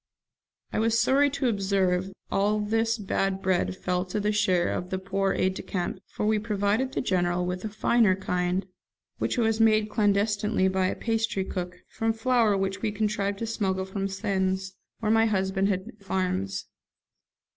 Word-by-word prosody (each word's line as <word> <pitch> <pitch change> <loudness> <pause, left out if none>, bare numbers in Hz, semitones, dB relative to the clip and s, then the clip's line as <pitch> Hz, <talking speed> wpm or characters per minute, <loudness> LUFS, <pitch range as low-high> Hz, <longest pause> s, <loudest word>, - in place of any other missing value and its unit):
I - - 0
was 225 +1 +2
sorry 280 +4 +4
to 275 -1 -1
observe 190 -4 +1
that 195 - -11 0.2
all 205 +2 +2
this 225 +2 +1
bad 195 -2 -1
bread 185 -1 0
fell 180 -1 -1
to 195 +3 -3
the 210 +1 +1
share 185 -4 +2
of 180 - -4
the 190 - -1
poor 195 +1 0
aide 185 0 +1
de - - -6
camp, 185 +1 -3
for - - -4
we 215 0 +2
provided 210 +4 0
the - - 0
General 180 -4 +1
with 180 +1 -3
a 215 - -3
finer 215 -1 +3
kind, 180 0 -1 0.5
which - - -1
was 225 -2 +2
made 215 -1 +4
clandestinely 205 -1 +2
by 190 0 +1
a - - -2
pastrycook, 195 -5 -2
from 225 0 -1
flour 225 -3 +2
which 195 0 -2
we 220 - 0
contrived 205 -1 -1
to 230 - -3
smuggle 190 -4 -1
from 195 +1 -3
Sens, 190 -1 -1 0.3
where 215 -1 +1
my 225 0 +4
husband 190 -1 +1
had 190 -2 0
some - - -12
farms. 180 - -2
195 Hz, 175 wpm, -27 LUFS, 190-215 Hz, 0.5 s, sorry